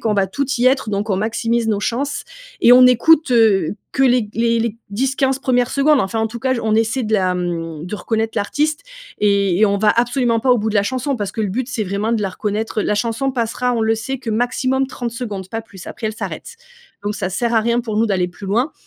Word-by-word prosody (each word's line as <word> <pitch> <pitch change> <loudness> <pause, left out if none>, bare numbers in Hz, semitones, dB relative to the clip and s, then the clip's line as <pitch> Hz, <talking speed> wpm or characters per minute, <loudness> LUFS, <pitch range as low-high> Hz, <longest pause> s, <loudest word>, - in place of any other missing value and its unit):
qu'on 215 -2 0
va 195 -1 +2
toutes 265 +6 -2
y 245 - +3
être, 260 -4 +2
donc 200 +2 -2
on 195 - +1
maximise 230 +2 -1
nos 210 -2 +1
chances 275 +7 -2 0.4
et 245 - +7
on 255 0 +8
écoute, 280 +4 +4
heu, 210 -6 +3 0.2
que 270 - +1
les 245 -4 +2
les 230 0 +1
les 230 -1 -2
10-15 265 +4 0
1res 245 -2 +1
secondes. 285 0 +3
Enfin, 195 +4 -2
en 225 - +1
tout 235 - -7
cas, 260 -1 +1
j 235 - -3
on 220 -1 +1
essaie 225 +3 +1
de 215 - -3
la, 185 -3 +2
mmh, 165 -2 -4
de 195 - -5
reconnaître 225 +3 -2
l'artiste 300 +9 -1 0.4
et 200 -3 +2
et 215 - +6
on 200 - +1
va 210 0 +4
absolument 240 0 +1
pas 260 - +1
au 245 - +4
bout 220 +1 -1
de 215 - -5
la 200 - +4
chanson, 260 +3 -2
parce 205 -3 -4
que 220 - -4
le 205 - -1
but, 245 +6 -3
c'est 250 -3 -2
vraiment 200 +4 -2
de 220 -2 0
la 195 - 0
reconnaître. 210 +2 -3
La 210 - 0
chanson 230 +5 -1
passera, 245 0 -1
on 225 - 0
le 220 0 +2
sait, 245 +5 -4
que, 235 -3 -5
maximum, 255 +3 0
30 240 -3 -5
secondes. 210 -6 -6
Pas 225 - -3
plus. 195 -5 -13
Après, 220 - -5
elle 215 - -3
s'arrête. 470 - -6 0.5
Donc, 205 +1 -2
ça 185 - -3
sert 235 +5 -1
à 225 - +4
rien, 235 +2 +1
pour 220 -3 -4
nous, 230 - +3
d'aller 185 -3 0
plus 195 +2 -10
loin. 240 +9 0
225 Hz, 250 wpm, -19 LUFS, 205-250 Hz, 0.5 s, on